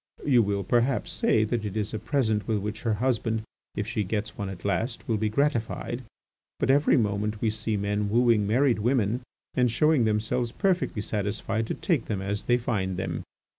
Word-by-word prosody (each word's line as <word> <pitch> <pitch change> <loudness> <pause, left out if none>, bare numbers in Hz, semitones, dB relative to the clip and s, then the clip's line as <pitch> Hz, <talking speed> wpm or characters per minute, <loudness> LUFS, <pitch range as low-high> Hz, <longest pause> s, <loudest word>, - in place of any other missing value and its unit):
You 125 -5 +5
will, 100 -2 0
perhaps, 120 +6 +1
say 110 - +2
that 110 +1 -1
it 105 0 -4
is 105 0 -2
a 110 - -2
present 110 -8 0
with 110 -2 +1
which 105 +2 -4
her 115 -3 +1
husband, 115 -1 0 0.3
if 105 - -1
she 110 -1 -1
gets 105 +2 -3
one 100 -1 -4
at 95 -1 -8
last, 110 +5 -1
will 115 - +1
be 110 +1 0
gratified; 120 -1 -1 0.6
but - - +3
every 145 +2 +4
moment 105 -1 0
we 110 0 +1
see 110 0 -2
men 105 +1 -1
wooing 115 -2 +3
married 125 +2 +3
women 120 0 +1 0.3
and 125 -1 +3
showing 140 +2 +3
themselves 115 +3 0
perfectly 180 - 0
satisfied 110 +2 -2
to - - -2
take 160 - 0
them 105 -3 -2
as 100 +1 -3
they 120 - +4
find 100 -7 -1
them. 95 - -3
110 Hz, 190 wpm, -27 LUFS, 105-120 Hz, 0.6 s, You